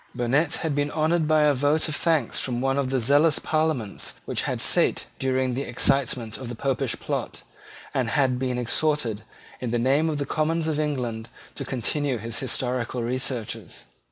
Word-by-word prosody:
Burnet 140 +6 +1
had 160 - 0
been 145 +1 0
honoured 160 +1 +1
by 155 -1 +4
a 150 -1 +5
vote 145 +4 +2
of 155 - -1
thanks 165 -2 +1
from 120 -2 -1
one 135 +2 +1
of 135 -2 0
the 130 0 +1
zealous 145 +6 +4
Parliaments 155 -10 -1
which - - -1
had - - -2
sate - - +3
during 130 -1 +1
the 130 - -2
excitement 125 -5 0
of 130 -3 -6
the 120 - -5
Popish 135 +1 -1
plot, - - -4 0.5
and 125 -4 0
had 130 -2 +2
been 125 -1 -1
exhorted, 125 -3 +1 0.4
in 125 - -3
the 120 - +1
name 135 +7 +2
of 155 - -1
the 140 - -1
Commons 160 +3 0
of 155 -1 0
England, 125 -7 -2 0.2
to - - -5
continue 135 +2 -1
his 115 +1 -4
historical 125 -1 -2
researches. 125 - -3
135 Hz, 180 wpm, -25 LUFS, 125-150 Hz, 0.5 s, a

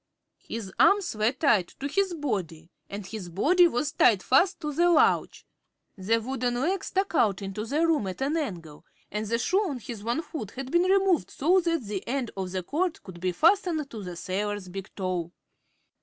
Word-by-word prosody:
His 205 -5 -7
arms 400 - +4
were 215 +2 +2
tied 235 - +2
to 275 - -2
his 380 +4 0
body 180 - -4 0.2
and 200 0 -6
his 195 -3 -7
body 345 - +4
was 290 0 -1
tied 210 -8 +4
fast 355 +8 +3
to 300 -2 -3
the 345 +4 +3
lounge. 330 -3 +2 0.5
The 210 +4 +1
wooden 245 +1 -2
leg 335 +10 0
stuck 385 0 -1
out 205 - +2
into 195 +3 -5
the 300 +7 +1
room 310 -11 +1
at 185 - -6
an 290 +4 0
angle 175 - -5 0.3
and 210 +1 -3
the 230 +2 +1
shoe 360 +10 +1
on 330 -11 -2
his 230 -3 -8
one 235 +8 -1
foot 245 -13 -6
had 265 0 -6
been 345 +1 +3
removed 380 -3 +3
so 350 +7 +3
that 335 -5 0
the 200 -2 -4
end 255 -1 -2
of 190 -1 -3
the 185 -1 -3
cord 335 - -2
could 180 -3 -11
be 185 0 0
fastened 325 - +2
to 220 - -7
the 180 -2 -7
sailor's 200 +2 -3
big 195 +2 -7
toe. 180 -3 -3
240 Hz, 195 wpm, -27 LUFS, 195-330 Hz, 0.5 s, arms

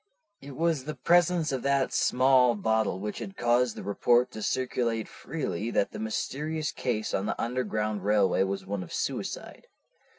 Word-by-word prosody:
"It 140 -1 -9
was 160 -4 0
the 155 0 -4
presence 175 -2 +3
of 130 -2 -2
that 140 0 +1
small 130 -1 +4
bottle 110 -2 0
which 105 +1 -4
had 195 - -7
caused 120 0 +2
the - - -7
report 120 +4 +2
to 110 - -7
circulate 120 -2 -1
freely 120 - -4
that 100 - +1
the - - -7
mysterious 150 +8 -2
case 110 -4 -2
on 95 +2 0
the - - -3
Underground 110 -4 -2
Railway 105 -2 +3
was 95 0 -1
one 100 0 -3
of 90 - -9
suicide. - - -4
120 Hz, 165 wpm, -28 LUFS, 105-140 Hz, -, small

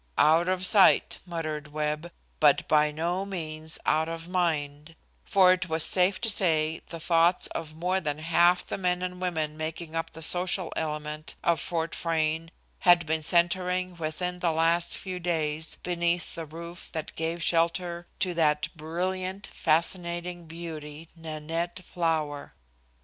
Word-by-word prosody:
"Out 160 +3 +5
of 185 0 0
sight," 195 0 +5
muttered 155 -3 -4
Webb, 150 +2 -2 0.3
"but 150 -2 +4
by 150 -1 +4
no 170 +5 -1
means 160 -5 -3
out 160 +1 +2
of 165 0 -6
mind," 160 -4 -1 0.3
for 185 -2 +5
it 185 -1 -3
was 160 0 +2
safe 185 +1 +2
to 235 - 0
say 160 -6 +2
the 165 - -6
thoughts 170 +2 +3
of 155 -2 -6
more 180 +3 0
than 150 -3 -2
half 170 +3 +3
the - - -4
men 180 -1 0
and 180 0 -4
women 160 -4 -1
making 160 +1 -5
up 165 0 -2
the 160 - -5
social 180 +1 0
element 150 0 -4
of 170 -1 +2
Fort 165 -1 -2
Frayne 160 -1 -1 0.3
had 175 -1 +5
been 160 0 0
centering 180 +2 +2
within 175 +2 -3
the 175 -2 +1
last 165 +2 +2
few 185 -2 -5
days 160 -2 -1
beneath 175 -1 0
the 165 -2 -6
roof 170 +3 -9
that 160 -2 -5
gave 165 +1 -2
shelter 170 +1 0
to 185 -2 +1
that 150 -3 +2
brilliant, 185 +4 -3
fascinating 175 +1 -1
beauty 160 -1 -8
Nanette 165 +2 -4
Flower. 160 -4 -2
165 Hz, 150 wpm, -28 LUFS, 155-180 Hz, 0.3 s, Out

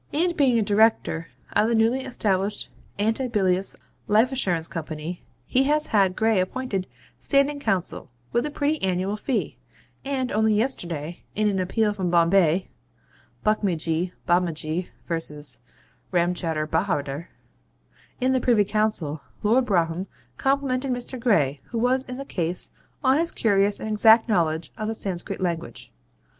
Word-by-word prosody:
And 340 +3 +1
being 265 -6 +4
a 225 - +3
Director 210 -5 +2 0.3
of 215 - +3
the 235 - +2
newly 230 +4 +2
established 200 -3 -1 0.3
Antibilious 205 -4 0 0.3
Life 220 +5 +4
Assurance 180 -11 0
Company, 160 +1 -5 0.2
he 260 - +2
has 300 +2 +2
had 195 -3 +2
Gray 220 -2 +2
appointed 195 0 -2 0.3
Standing 280 +1 +2
Counsel, 190 - -2 0.2
with 240 - +1
a - - -3
pretty 295 +1 -1
annual 190 +2 0
fee; 240 +4 -2 0.5
and 265 -2 -2
only 215 0 +3
yesterday, 175 - -2
in 215 0 +2
an 195 -2 0
appeal 210 +3 +1
from 190 -3 -2
Bombay 170 +1 +3 0.8
(Buckmuckjee 175 -5 0 0.2
Bobbachee 175 -1 0 0.2
v. 150 -7 -4 0.5
Ramchowder 170 -3 0
Bahawder) 155 -2 -1 0.9
in 255 0 +2
the 260 -1 +2
Privy 230 -5 +4
Council, 200 -8 0 0.2
Lord 245 +4 +3
Brougham 175 -1 +1 0.3
complimented 270 -1 0
Mr. 250 +1 -4
Gray, 150 - +2
who 235 - -5
was 250 +3 +2
in 250 0 -6
the 275 - -6
case, 175 -6 -2 0.3
on 265 +2 +4
his 335 +1 0
curious 200 -5 +2
and 220 - -4
exact 220 +2 +6
knowledge 165 -6 0
of 215 - -2
the 225 - -2
Sanscrit 195 0 -4
language. 170 -3 -4
205 Hz, 140 wpm, -25 LUFS, 175-245 Hz, 0.9 s, exact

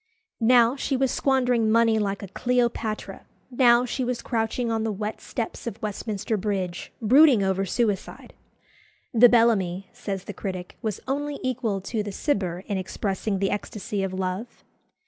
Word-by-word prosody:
Now 240 +1 +5
she 270 -1 -1
was 265 0 +1
squandering 250 -4 +2
money 225 0 +4
like 200 -1 -2
a - - -5
Cleopatra; 235 -1 -1 0.2
now 245 -1 +5
she 255 +1 -2
was 245 -1 -2
crouching 230 0 -1
on 225 -1 0
the 220 - -1
wet 210 +1 -4
steps 235 -1 -5
of 225 -2 -5
Westminster 215 0 -3
Bridge, 190 -3 -3
brooding 255 -1 +6
over 190 0 0
suicide. 210 -1 -2 0.8
"The 240 +1 +8
Bellamy," 195 -6 +2
says 195 -3 -5
the 205 - -7
critic, 185 -3 -6
was 215 -4 -3
only 285 +2 -2
equal 235 -6 -1
to 215 +3 -2
"the 205 0 -5
Cibber" 190 - -1
in 200 -2 -2
expressing 195 +2 -2
the 195 0 0
ecstasy 205 0 -3
of 195 -1 -2
love. 185 +5 -4
220 Hz, 155 wpm, -25 LUFS, 195-245 Hz, 0.8 s, The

